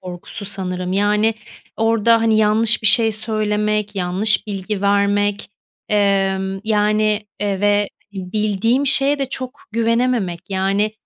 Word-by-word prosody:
korkusu 180 +3 -7
sanırım. 185 -2 -4
Yani 210 +2 +1 0.4
orada, 230 0 +3
hani, 225 -1 +2
yanlış 220 +1 +2
bir 215 - +2
şey 225 0 +5
söylemek, 210 -1 -1
yanlış 190 +5 0
bilgi 200 0 -4
vermek, 205 0 +1 0.4
ımm, 195 -1 0
yani, 210 0 +1
eee, 200 -2 -2
ve 205 0 +2 0.2
bildiğim 210 +7 -1
şeye 280 0 +3
de 270 -1 -2
çok 255 -1 -7
güvenememek. 230 -5 0
Yani, 195 +3 0
210 Hz, 120 wpm, -19 LUFS, 195-220 Hz, 0.4 s, şey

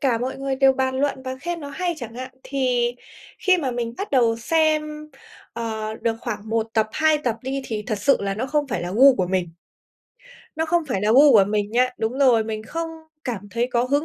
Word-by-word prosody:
cả 255 -5 +2
mọi 255 +3 -3
người 270 -1 -2
đều 270 0 +5
bàn 260 0 -1
luận 280 -2 -1
và 260 0 -5
khen 345 +2 -4
nó 285 - -7
hay 350 +4 -2
chẳng 235 -4 -8
hạn, 255 +1 -6
thì 250 -3 0 0.4
khi 375 -1 +3
mà 270 -6 -1
mình 235 -1 -3
bắt 400 - -4
đầu 235 -4 +3
xem, 305 +3 0 0.4
ờ, 220 -2 -4
được 225 0 -2
khoảng 215 -2 -5
1 225 0 0
tập, 220 -1 +2
2 315 -1 +3
tập 245 -6 -1
đi 270 +1 -3
thì 215 -4 -4
thật 215 -4 -2
sự 275 - +3
là 195 -1 -2
nó 235 +5 -3
không 295 +1 0
phải 220 - -2
là 175 - -4
gu 265 +5 +7
của 185 -6 0
mình. 180 -2 -2 1.0
Nó 320 0 0
không 340 0 +1
phải 195 - -1
là 210 +2 +2
gu 280 +3 +7
của 205 -4 +7
mình 210 0 -1
nha 250 +2 +3
đúng 225 +4 -2
rồi, 245 -5 +4
mình 215 -1 -4
không 330 +8 -4 0.4
cảm 205 -6 -4
thấy 235 +3 -1
có 240 0 +2
hứng 285 +3 +1
250 Hz, 230 wpm, -23 LUFS, 225-285 Hz, 1.0 s, gu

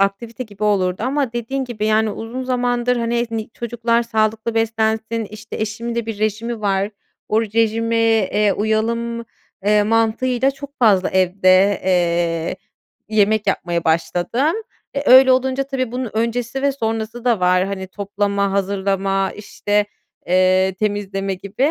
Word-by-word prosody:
aktivite 225 +5 -1
gibi 210 -2 -6
olurdu 190 -2 +1
ama 265 0 0
dediğin 240 +3 -3
gibi, 215 -4 -3
yani 215 0 +2
uzun 230 +5 -5
zamandır, 245 -1 0
hani, 235 0 0
ni 225 -1 -4
çocuklar 235 0 -1
sağlıklı 220 0 -1
beslensin, 225 0 0
işte, 215 0 -8
eşimin 220 +2 -3
de 235 -1 -2
bir 220 -2 -5
rejimi 220 +2 -2
var, 195 0 0 0.4
o 220 +2 +2
rejime, 225 +1 0 0.3
eee, 210 -1 +2
uyalım, 230 +2 -1 0.4
eee, 210 0 +4
mantığıyla 225 +4 +1
çok 280 +1 -11
fazla 205 -6 +4
evde, 185 +1 +3
eee, 170 -2 +1 0.5
yemek 215 0 +2
yapmaya 175 -3 -1
başladım. 180 - +1 0.4
E 280 -2 0
öyle 260 0 +8
olunca 260 +1 +1
tabii 255 -3 -3
bunun 250 -3 -3
öncesi 235 +4 -1
ve 280 -1 +2
sonrası 225 -1 -3
da 235 -5 +2
var. 180 0 +3
Hani, 190 -1 -4
toplama, 200 0 -1
hazırlama, 195 0 0
işte, 205 0 -1 0.4
eee, 185 +1 +3
temizleme 195 -2 -2
gibi. 200 +10 -1
220 Hz, 140 wpm, -20 LUFS, 200-235 Hz, 0.5 s, öyle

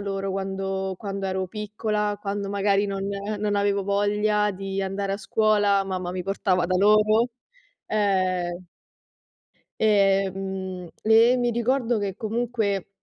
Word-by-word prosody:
loro 195 -1 -3
quando 190 0 -3
quando 195 -1 -4
ero 190 0 -2
piccola, 210 0 -2
quando 200 -1 -3
magari 200 0 +2
non 195 -1 -3 0.4
non 205 -1 0
avevo 200 0 +1
voglia 210 +1 +1
di 195 0 -4
andare 195 +1 -2
a - - -3
scuola, 205 -2 +2
mamma 185 -2 -3
mi 185 -1 -3
portava 185 -2 0
da 185 +1 +1
loro, 215 +3 +4 0.6
ehm 185 -4 0 1.1
Ehm, 195 -3 +1 0.2
e 225 +3 +6
mi 245 -1 +1
ricordo 240 0 +1
che 195 -2 -3
comunque, 220 -3 -2
200 Hz, 125 wpm, -25 LUFS, 195-210 Hz, 1.1 s, e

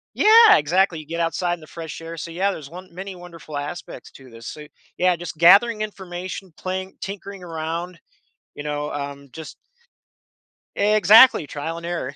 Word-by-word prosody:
Yeah, 445 +1 +7
exactly. 170 +2 +1
You 155 - -12
get 170 +1 -5
outside 175 +1 -1
in - - -18
the 155 - -14
fresh 165 -1 -8
air. 165 0 -8
So, 165 - -6
yeah, 190 +4 0
there's 150 -6 -8
won 180 +3 -11
many 190 +1 -7
wonderful 170 -4 -10
aspects 150 +5 -7
to 130 -2 -15
this. 115 0 -13
So, 150 0 -8 0.3
yeah, 180 0 +3
just 170 -2 -8
gathering 210 +6 +6
information, 185 -3 -7
playing, 190 +1 -5
tinkering 195 -1 -7
around, 165 +1 -5 0.5
you 145 - -8
know, 150 0 -3
um, 140 -1 -6
just 160 -1 -10 1.2
Exactly, 215 - +6
trial 150 +4 -5
and 170 - -8
error. 165 -6 -4
170 Hz, 170 wpm, -22 LUFS, 155-190 Hz, 1.2 s, Yeah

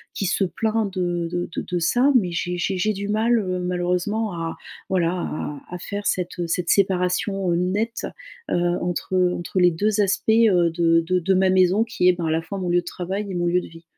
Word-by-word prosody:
qui 200 - -2
se 195 - +1
plaint 220 +1 -1
de 175 -2 -1
de 175 0 -3
de - - -1
de 180 - -3
ça. 245 +11 +3
Mais 185 -8 +3
j'ai 175 +1 -2
j'ai 190 +2 -1
j'ai 215 +4 +1
du 200 +1 -5
mal, 225 +3 +2
heu, 185 -3 -2
malheureusement, 180 +4 -1
à, 165 -1 -4 0.3
voilà, 175 -3 +1
à 150 -5 -4
à 180 - -4
faire 200 +3 -4
cette, 180 -1 -2
heu 175 - -1
cette 170 +1 -1
séparation, 185 0 +1
heu, - - +2
nette, 200 +6 -1 0.4
heu, - - +2 0.3
entre, 175 +1 -2
heu 180 -1 +3
entre 175 +2 -3
les 180 0 +6
2 210 +5 +1
aspects, 200 +2 0
heu, 190 -7 +4
de 165 0 +3
de 180 +2 0
de 190 +3 +1
ma 190 0 +3
maison, 185 +3 +4
qui 215 -6 +1
est, - - +5
ben, 175 -1 -4
à 155 - 0
la 160 - +1
fois 195 +4 -6
mon 180 -1 -2
lieu 175 - +3
de - - -23
travail 190 +4 -4
et 185 - -4
mon 175 0 0
lieu 180 +1 +2
de - - -9
vie. 165 0 -14
180 Hz, 235 wpm, -23 LUFS, 175-200 Hz, 0.4 s, les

